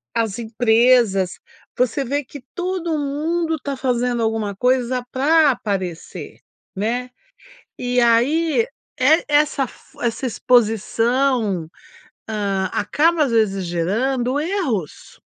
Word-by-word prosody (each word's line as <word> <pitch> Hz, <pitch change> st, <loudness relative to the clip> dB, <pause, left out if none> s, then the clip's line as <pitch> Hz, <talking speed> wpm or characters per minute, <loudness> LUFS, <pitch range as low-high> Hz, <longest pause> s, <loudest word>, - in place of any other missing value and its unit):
as 225 Hz, -1 st, -1 dB
empresas, 225 Hz, -4 st, +2 dB, 0.4 s
você 250 Hz, +3 st, +1 dB
vê 285 Hz, +3 st, -2 dB
que 280 Hz, +2 st, -11 dB
todo 355 Hz, -3 st, -2 dB
mundo 320 Hz, +3 st, -1 dB
tá 280 Hz, 0 st, -4 dB
fazendo 245 Hz, -2 st, 0 dB
alguma 220 Hz, -3 st, -1 dB
coisa 250 Hz, +1 st, 0 dB
pra 300 Hz, +3 st, +4 dB
aparecer, 190 Hz, -8 st, -5 dB, 0.4 s
né. 240 Hz, +5 st, -2 dB, 0.7 s
E 250 Hz, 0 st, 0 dB
aí 300 Hz, -, +3 dB, 0.3 s
e 305 Hz, +6 st, +4 dB
essa 290 Hz, -2 st, +2 dB
fo -, -, -19 dB
essa 235 Hz, +2 st, -2 dB
exposição, 230 Hz, -4 st, +1 dB, 0.6 s
hã, 200 Hz, -3 st, -1 dB
acaba 310 Hz, +9 st, +2 dB
às 260 Hz, -, -2 dB
vezes, 195 Hz, -4 st, +1 dB
gerando 240 Hz, +10 st, -1 dB
erros. 295 Hz, -, -3 dB
245 Hz, 105 wpm, -20 LUFS, 220-285 Hz, 0.7 s, pra